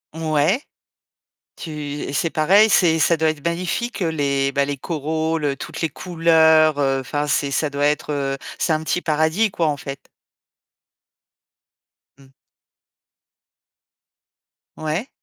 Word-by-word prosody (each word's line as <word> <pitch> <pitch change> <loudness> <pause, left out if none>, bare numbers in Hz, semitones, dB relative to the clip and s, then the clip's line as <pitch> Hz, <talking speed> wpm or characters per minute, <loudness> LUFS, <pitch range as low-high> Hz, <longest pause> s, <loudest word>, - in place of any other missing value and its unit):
Ouais, 160 - +1 1.0
tu 165 - -8
et 145 -2 -5
c'est 165 - 0
pareil, 195 +8 +4
c'est 170 -5 +3
ça 170 +1 +3
doit 160 0 +2
être 150 -2 -7
magnifique, 185 +7 -2
heu, 165 - 0
les, 140 -3 0
bah, 140 +1 +1
les 145 0 -3
coraux, 160 +2 -2
le 145 -3 -1
toutes - - -8
les 165 - 0
couleurs, 160 -2 +3
heu, 135 -1 +1
enfin 145 +3 -3
c'est 140 0 0
ça 145 +2 0
doit 145 0 0
être, 150 +1 -1
heu, 135 -1 -2 0.2
c'est 160 - +1
un 155 - -2
petit 180 - -1
paradis 160 +7 +1
quoi 165 -4 0
en 145 - -2
fait. 135 0 -8 2.1
Mmh. 135 -1 -19 2.5
Ouais. 155 - -3
155 Hz, 140 wpm, -21 LUFS, 145-165 Hz, 2.5 s, pareil